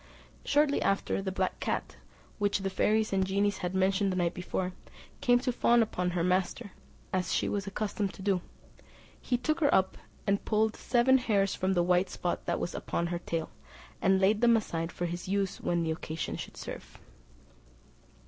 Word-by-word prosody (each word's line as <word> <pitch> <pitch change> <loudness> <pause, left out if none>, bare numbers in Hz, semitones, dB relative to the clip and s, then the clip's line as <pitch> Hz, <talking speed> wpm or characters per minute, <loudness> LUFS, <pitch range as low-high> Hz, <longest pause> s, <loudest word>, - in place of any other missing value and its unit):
Shortly 290 0 +2
after 195 0 0
the 190 -1 -3
black 185 - -1
cat, - - -2 0.4
which 205 -1 +1
the 195 0 -2
fairies 215 +2 +1
and 190 - +2
the 190 - +1
genies 200 +1 +1
had 180 +1 -3
mentioned 190 +1 +2
the - - -2
night 175 -1 +1
before, 180 +1 -3 0.5
came 245 -1 +5
to 255 - 0
fawn 235 -1 +4
upon 180 -4 -2
her 170 - +1
master, 185 +2 0 0.4
as 185 -2 0
she - - +1
was 200 -1 -2
accustomed 200 0 -2
to 190 - -10
do; 195 -3 +1 0.8
he 245 - 0
took 310 +7 -1
her 285 -3 +3
up, 190 0 +2 0.3
and 200 0 +1
pulled 220 0 +1
seven 260 +2 +3
hairs 200 -5 +1
from 190 +1 0
the 175 -2 +2
white 180 +1 +2
spot 175 - -3
that 170 - 0
was - - -3
upon 170 - -2
her 170 - -2
tail, 165 -2 -3 0.5
and 190 0 +4
laid 205 +3 +3
them 235 -1 +6
aside 165 -6 -3
for 175 - -3
his 175 +1 -4
use 195 0 -1
when 170 -1 0
occasion 160 0 -3
should - - -8
serve. - - -8
195 Hz, 185 wpm, -30 LUFS, 180-215 Hz, 0.8 s, them